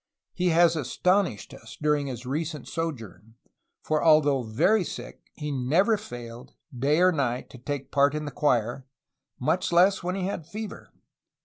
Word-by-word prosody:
Hs 180 0 +1
has 170 0 +5
astonished 160 - 0
us 115 0 -12
during 150 -2 +1
his 125 -2 -6
recent 150 +2 -4
sojourn, 115 - -6 0.5
for, 155 -1 0
al 155 -2 +7
though 140 -3 +1
very 125 - +2
sick, - - -9
he 150 -2 -4
never 155 - +2
failed, 120 - -9 0.2
day 140 +6 +2
or 185 +1 +5
night, 130 -6 -2
to 125 - -12
take 140 +1 -5
part 140 +1 +3
in 150 0 -3
the 145 - -5
choir, 125 -2 0 0.5
much 175 +9 0
less 180 +3 +4
when 180 +1 -2
he 195 - -3
had 180 -5 -4
fever. 215 +4 -8
150 Hz, 165 wpm, -26 LUFS, 125-175 Hz, 0.5 s, al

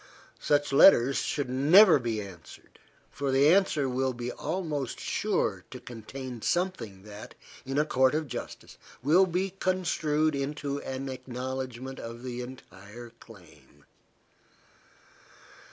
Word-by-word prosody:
Such 145 -1 +1
letters 135 -4 +6
should 145 -3 -2
never 155 +8 +6
be 115 -3 -2
answered, 95 -6 -12 0.3
for 140 -1 -3
the 140 +4 +5
answer 185 -8 +2
will 130 +1 -1
be 120 0 -5
almost 155 -5 -4
sure - - -1
to - - -9
contain 125 +1 -8
something 120 - -2
that, 105 0 -11 0.3
in 135 +1 -2
a 150 - +3
court 130 -1 +2
of 155 -1 -2
justice, 120 -2 -8 0.2
will 175 +7 +5
be 185 +2 -1
construed 155 -4 0
into 140 0 -3
an 135 +1 -5
acknowledgment 130 0 -6
of 115 +1 -8
the 125 -1 -5
entire 120 -2 -11
claim. 105 -7 -18
135 Hz, 120 wpm, -28 LUFS, 120-150 Hz, 0.3 s, letters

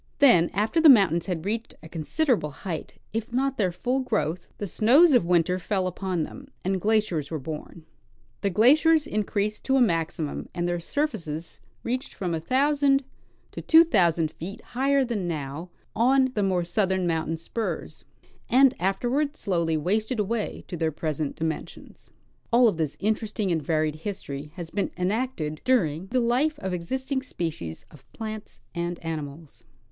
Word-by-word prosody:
Then, 205 -12 +6
after 220 +11 +1
the 320 - +8
mountains 190 - +5
had 175 -3 -3
reached 225 +3 -3
a - - -9
considerable 170 - 0
height, 160 +3 -6 0.2
if 225 +2 -3
not 270 +1 0
their 185 -4 +2
full 250 +9 -1
growth, 205 - -1
the 205 - -3
snows 270 - +5
of 215 -9 +4
winter 180 +1 +2
fell 190 +1 -1
upon 185 -2 -2
them, 270 - -9 0.2
and 190 0 0
glaciers 205 -9 +1
were 160 - -3
born; 155 +3 -8 0.6
the 200 - +1
glaciers 295 - +5
increased 210 -4 -2
to 270 - +2
a - - +4
maximum, 165 - 0
and 175 0 -1
their 175 0 -1
surfaces 170 - -3 0.2
reached 250 +3 -3
from 180 -3 -2
a 165 - -1
thousand 275 - +2 0.5
to - - -6
tAVO 330 +1 +6
thousand 165 -3 +3
feet 190 +5 -8
higher 275 +2 +2
than 210 -7 -2
now 155 +1 -4 0.3
on 260 +2 +3
the 210 - 0
more 185 -3 +1
southern 190 +1 0
mountain 165 -1 -1
spurs, 215 +7 -5 0.5
and 265 +1 +6
afterward 245 - 0
slowly 170 - 0
wasted 215 - 0
away 210 +1 -2
to 180 - -5
their 160 -1 0
present 155 -1 -3
dimensions. 160 -1 -6 0.4
All 240 +1 +6
of 205 - +1
this 155 -3 -2
interissting 215 -1 -1
and 165 -2 +1
varied 155 0 0
history 150 -5 -6
has 170 -3 -7
been 200 - -1
enacted 180 -5 -2
during 185 - +1
the 255 +5 +1
life 255 +6 +1
of 190 -7 -4
existing 265 +10 -2
species 130 - -5
of 145 -4 -16
plants 220 -1 -7
and 175 0 -3
animals. 150 -5 -6
190 Hz, 160 wpm, -26 LUFS, 165-245 Hz, 0.6 s, the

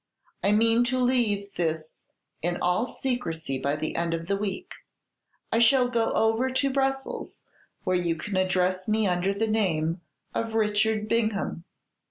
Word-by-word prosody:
I 200 - +4
mean 225 +2 +4
to 255 +1 0
leave 230 -6 +1
this 160 -2 -2 0.4
in 175 +2 0
all 180 +8 +1
secrecy 165 - -2
by 140 +2 0
the 155 +1 -3
end 170 0 0
of 165 0 -5
the 200 +3 0
week. 210 - -4 0.8
I 225 - +3
shall 245 +2 +5
go 230 -2 +1
over 225 +4 +2
to 265 +1 0
Brussels, 270 0 -2 0.4
where 185 0 +2
you 170 -2 0
can 190 +5 -5
address 185 0 +1
me 215 0 +2
under 180 +1 +1
the 210 +3 -1
name 170 -6 0 0.3
of 225 -1 -2
Richard 215 0 +1
Bingham. 215 -6 -1
210 Hz, 155 wpm, -27 LUFS, 175-230 Hz, 0.8 s, shall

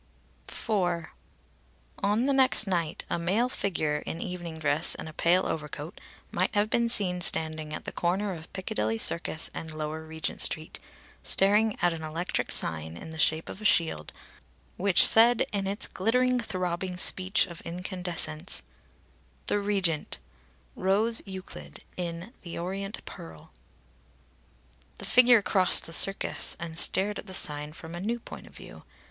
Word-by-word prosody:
IV. - - -7 1.3
On 210 +5 +1
the 280 - +2
next 260 -4 +4
night 170 -5 -2
a - - -2
male 200 +9 +1
figure 155 - -1
in 165 - -6
evening 175 -3 -6
dress 155 0 +4
and - - -8
a 155 - -9
pale 175 +4 +2
overcoat 150 +2 -5 0.3
might - - -1
have 210 +1 +1
been 235 0 +1
seen 185 -6 +1
standing 155 -2 +3
at - - -6
the - - -6
corner 190 +3 -1
of 160 -2 -10
Piccadilly 110 - -2
Circus 160 +5 +2
and 160 - -5
Lower 155 +1 -4
Regent 160 0 -4
Street, 155 0 +1 0.4
staring 210 +2 +3
at 175 -1 +3
an 165 - -7
electric 160 +3 -3
sign 80 +1 0
in 160 - -9
the 160 - -9
shape 160 +1 +2
of 200 - -9
a - - -9
shield 160 - +1 0.6
which 195 -1 +5
said 230 +1 +5
in 195 -1 -1
its 200 +2 -2
glittering, 250 +5 +1
throbbing 185 -4 -3
speech 185 +1 +3
of 170 -3 -11
incandescence: 175 - -3 0.8
THE 205 - 0
REGENT 195 -6 -1 0.6
ROSE 210 +5 +1
EUCLID 75 - -8
IN 175 +5 -6
THE 170 - -7
ORIENT 195 +3 -5
PEARL 80 -1 -11 1.5
The - - -6
figure 245 -3 +6
crossed 185 -3 +4
the 165 - -5
Circus, 195 +4 +2
and 165 -1 -3
stared 205 +2 +2
at - - -10
the 190 - -1
sign 150 -2 +1
from 160 +1 -10
a 175 - -6
new 230 +4 -2
point - - -11
of - - -17
view. - - -12
180 Hz, 155 wpm, -28 LUFS, 160-200 Hz, 1.5 s, figure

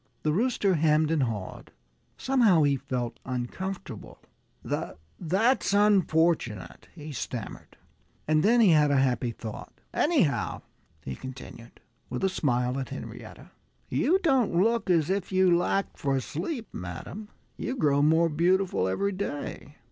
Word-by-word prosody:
The 155 - +1
Booster 210 +1 +1
hemmed 155 -1 +2
and 160 -3 +2
hawed. 110 -7 -4 0.5
Somehow 230 - +3
he 140 -1 +3
felt 125 -2 -4
uncomfortable. 130 +10 -5 0.5
"That's 190 - -1
unfortunate," 165 - +1
he 155 -2 -8
stammered. 125 -4 -6 0.5
And 155 0 +3
then 235 +6 +4
he 210 - +6
had 150 -3 +5
a 140 - +3
happy 125 -2 +1
thought. 110 -1 -8 0.2
"Anyhow," 275 - +1 0.4
he 65 - -5
continued, 130 - -11 0.3
with - - -4
a 190 - +3
smile 125 -6 0
at 130 - -5
Henrietta, - - -9 0.4
"you 360 +5 +2
don't 265 - +2
look 225 +4 +2
as 170 -1 +3
if 195 -1 -2
you 185 -2 +4
lacked 185 +3 -1
for 135 -1 0
sleep, 215 - -5
madam. 90 - -7 0.3
You 255 - -4
grow 145 - +2
more 160 +3 +4
beautiful 175 - +1
every 200 - 0
day." 145 -5 -5
160 Hz, 135 wpm, -27 LUFS, 130-195 Hz, 0.5 s, he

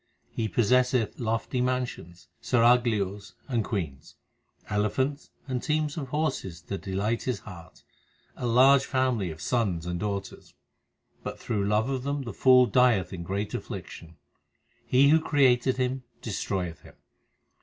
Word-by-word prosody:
He 110 - -2
possesseth 125 +2 +2
lofty 115 +2 -1
mansions, 125 -9 -3
seraglios 110 -6 +2
and 120 -5 0
queens, 80 - -5 0.5
Elephants 130 +8 -1 0.2
and 130 -2 -2
teams 150 -1 -1
of 145 -5 -4
horses 135 - -2
to 100 - -5
delight 100 +4 -2
his 125 - -2
heart, 90 -5 -12 0.5
A 125 - -3
large 130 +3 +6
family 130 -8 0
of 80 0 -8
sons 95 -9 -1
and 90 0 -3
daughters; 100 0 -5 0.7
But - - -6
through 100 -2 -1
love 105 +3 +2
of 135 -2 -2
them 140 +1 -2
the 115 -4 -6
fool 125 +3 +6
dieth 120 -8 +3
in 90 - -5
great 100 +4 -3
affliction. 85 0 -7 0.7
He 135 +2 +5
who 160 +2 +6
created 130 -4 +3
him, 130 +1 -1 0.2
destroyeth 95 -5 -3
him. - - -16
115 Hz, 135 wpm, -27 LUFS, 100-130 Hz, 0.7 s, large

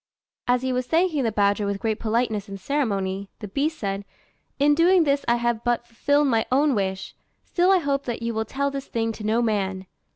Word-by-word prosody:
As 245 +1 +2
he 260 0 0
was 250 0 -1
thanking 325 -4 +2
the 225 - +1
badger 205 0 +1
with 200 0 -2
great 220 +1 -1
politeness 220 -2 -1
and 195 0 -7
ceremony, 200 -8 -1
the 210 - -7
beast 295 +9 -1
said, 195 -1 -3 0.5
"In 290 +1 +4
doing 345 +3 +5
this 280 -2 +1
I 235 - +4
have 235 -1 -1
but 240 0 0
fulfilled 285 +5 +1
my 225 -5 +2
own 280 +2 +3
wish; 190 -3 -2 0.3
still 360 +1 +1
I 385 - +6
hope 280 -4 -1
that 235 -1 -4
you 230 0 -1
will 220 0 -1
tell 280 +3 -2
this 275 -1 -5
thing 225 -1 -1
to 220 - -9
no 225 +3 +1
man." 195 -4 -1
235 Hz, 215 wpm, -24 LUFS, 210-280 Hz, 0.5 s, I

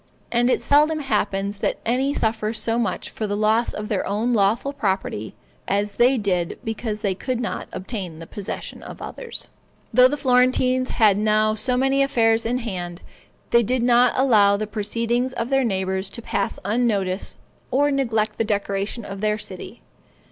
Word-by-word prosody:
And 240 +1 +2
it - - +2
seldom 300 +2 +4
happens 205 -7 -1
that - - -1
any 260 +4 +1
suffer 220 -4 -1
so 230 +1 0
much 220 -6 -2
for 215 - -3
the 205 0 -2
loss 220 +3 +2
of 210 0 -5
their 205 -3 -1
own 220 +5 0
lawful 225 +6 +1
property 190 - -2 0.3
as 200 +1 -1
they 255 +2 +4
did 180 -6 -1
because 220 -1 -4
they 200 -2 +1
could 250 +5 -3
not 235 - -3
obtain 185 -5 -5
the 165 - -9
possessions 200 +3 -7
of - - -10
others. 485 -2 -5 0.5
Though 250 +2 +7
the 290 +3 -2
Florentines 255 -1 +2
had 210 -4 +3
now 215 0 +2
so 250 +3 0
many 270 +1 +2
affairs 225 -4 +2
in 245 +2 0
hand, 180 -7 -5 0.5
they 235 - +6
did 245 +2 0
not 245 0 +4
allow 210 -6 +4
the 215 - -2
proceedings 230 +4 -1
of 235 -1 -3
their 270 0 +3
neighbors 190 -3 -1
to - - -6
pass 200 - -2
unnoticed, 205 -4 0 0.3
or 285 +3 +2
neglect 230 -6 0
the - - +3
decoration 205 +1 -2
of 195 0 -7
their 210 0 +1
city. 205 +3 -8
225 Hz, 170 wpm, -22 LUFS, 200-250 Hz, 0.5 s, Though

